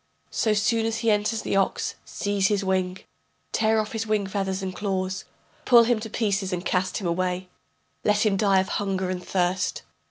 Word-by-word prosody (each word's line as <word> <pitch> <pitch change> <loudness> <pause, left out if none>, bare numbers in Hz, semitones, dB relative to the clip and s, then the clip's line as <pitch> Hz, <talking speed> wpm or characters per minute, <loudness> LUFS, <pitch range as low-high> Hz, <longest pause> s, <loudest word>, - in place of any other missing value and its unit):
So 220 - +1
soon 225 +2 +2
as 225 0 -1
he 230 -1 +2
enters 210 +1 0
the - - -1
ox, 195 -1 +1
seize 200 -1 0
his 205 -2 +1
wing, 185 0 0 0.5
Tear 220 0 +2
off 215 -1 -2
his 225 0 -3
wing 215 -2 +1
feathers 190 0 -2
and 185 -1 -4
claws, 190 -1 -2 0.4
Pull 240 -2 +7
him 235 -1 +2
to 220 +1 -6
pieces 200 -3 0
and 180 0 -3
cast 180 +1 0
him 195 - -5
away, 180 +1 -1 0.5
Let 210 +1 +3
him 205 -2 +3
die 195 -1 +3
of 190 - -4
hunger 190 -2 -1
and 180 -1 -4
thirst. 180 0 0
195 Hz, 190 wpm, -25 LUFS, 185-215 Hz, 0.5 s, Pull